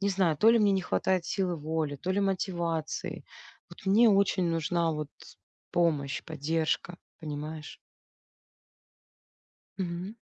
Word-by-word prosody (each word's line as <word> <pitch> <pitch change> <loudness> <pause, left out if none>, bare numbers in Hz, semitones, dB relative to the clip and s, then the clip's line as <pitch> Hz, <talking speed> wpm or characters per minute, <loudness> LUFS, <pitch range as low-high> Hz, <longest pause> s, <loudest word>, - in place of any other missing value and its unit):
не 200 - +1
знаю, 185 -6 +1
то 220 - +6
ли 230 - +5
мне 205 -2 +4
не 190 - +2
хватает 185 -1 0
силы 185 -3 0
воли, 155 -1 -2
то 180 +7 -4
ли 195 +2 +1
мотивации, 175 -5 -2 0.4
вот - - -14
мне 215 +5 +6
очень 200 -2 +3
нужна 165 0 +1
вот 150 -2 -4 0.6
помощь, 150 -5 +1
поддержка, 160 +3 -1 0.2
понимаешь? 155 0 -6 2.0
Мгм. 180 +2 -4
170 Hz, 125 wpm, -29 LUFS, 155-190 Hz, 2.0 s, то